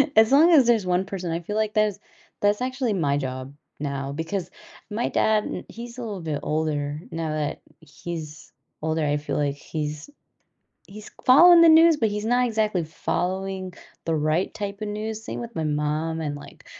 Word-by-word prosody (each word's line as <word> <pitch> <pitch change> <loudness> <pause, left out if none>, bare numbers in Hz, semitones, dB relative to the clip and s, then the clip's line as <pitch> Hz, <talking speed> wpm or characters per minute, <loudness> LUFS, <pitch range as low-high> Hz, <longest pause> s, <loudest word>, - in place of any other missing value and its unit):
As 220 +1 +6
long 310 +5 +6
as 280 -7 +6
there's 225 -5 +3
1 180 +1 +1
person, 185 -4 -4
I 165 - -1
feel 190 +5 -6
like 215 -1 0
that's 215 -2 +2 0.4
that's 205 +2 +2
actually 255 -2 -1
my 145 -7 +1
job 130 -1 -5 0.3
now 140 -1 -3
because 165 +5 -4 0.4
my 225 +3 -1
dad, 215 -1 +2
n - - -5
he's 235 +2 -9
a - - -5
little 210 -6 -5
bit 155 -3 -3
older. 150 -1 -1
Now 165 -5 -3
that 155 -1 -3 0.2
he's 160 0 -8 0.3
older, 160 0 -1
I 145 0 +1
feel 150 - -3
like 145 -1 0
he's 150 - -5 0.8
he's 210 +2 -11
following 335 +7 +8
the 335 - +8
news, 325 0 +7
but 225 - +2
he's 210 0 -3
not 245 +2 +2
exactly 215 -5 0
following 185 +3 -3 0.3
the 165 - +1
right 155 +4 0
type 200 -1 -5
of 210 - -3
news 215 +1 -4
same - - -5
with 235 -1 -8
my 160 - -2
mom 155 +2 -1
and, 145 -2 -3
like, 145 - -12
185 Hz, 185 wpm, -24 LUFS, 155-220 Hz, 0.8 s, following